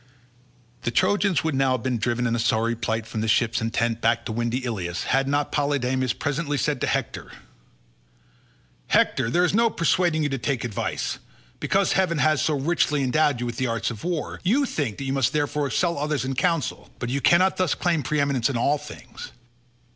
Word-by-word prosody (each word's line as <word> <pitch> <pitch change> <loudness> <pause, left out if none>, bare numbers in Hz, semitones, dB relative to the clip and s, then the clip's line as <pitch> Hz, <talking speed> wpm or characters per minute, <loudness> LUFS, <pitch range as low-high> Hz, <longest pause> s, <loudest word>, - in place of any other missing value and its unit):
The - - -1
Trojans 185 - +2
would 160 -1 0
now 135 -1 +2
have 125 - -2
been 125 -3 -1
driven 120 +2 0
in 115 -1 +1
sorry 115 0 +1
plight 110 -1 -2
from 110 -1 -4
the 110 - -1
ships 115 +2 +2
and 115 0 -2
tents 115 0 0
back 115 +1 +1
to - - -4
windy 120 +3 -2
Ilius, 90 -7 -3
had 135 0 +1
not 145 +1 0
Polydamas 130 -3 0
presently 145 0 -2
said 145 -2 -1
to - - 0
Hector, - - -3 1.6
"Hector, 120 -3 +2
there 175 +8 +3
is 180 - 0
no 230 +2 +4
persuading 170 -3 +1
you 145 - 0
to 135 -1 -3
take 130 -2 -1
advice. 115 -4 -3 0.4
Because 195 0 +1
heaven 185 -4 +1
has 155 -2 +2
so 155 - +1
richly 150 -1 +1
endowed 140 0 +2
you 125 - -2
with 120 -1 -5
the 130 - 0
arts 115 0 -1
of 110 - -9
war, 170 -3 -3
you 250 +10 +2
think 140 - -3
that - - -5
you 135 0 -2
must 135 -4 +1
therefore 145 -1 0
excel 170 +2 0
others 150 -2 -1
in 135 - -2
counsel; 165 +3 -1
but 120 - -4
you 140 +2 -1
cannot 185 +5 +4
thus 185 -4 +1
claim 170 -3 0
preeminence 140 -3 0
in 130 - -1
all 140 +5 +1
things. - - -10
135 Hz, 200 wpm, -24 LUFS, 120-155 Hz, 1.6 s, no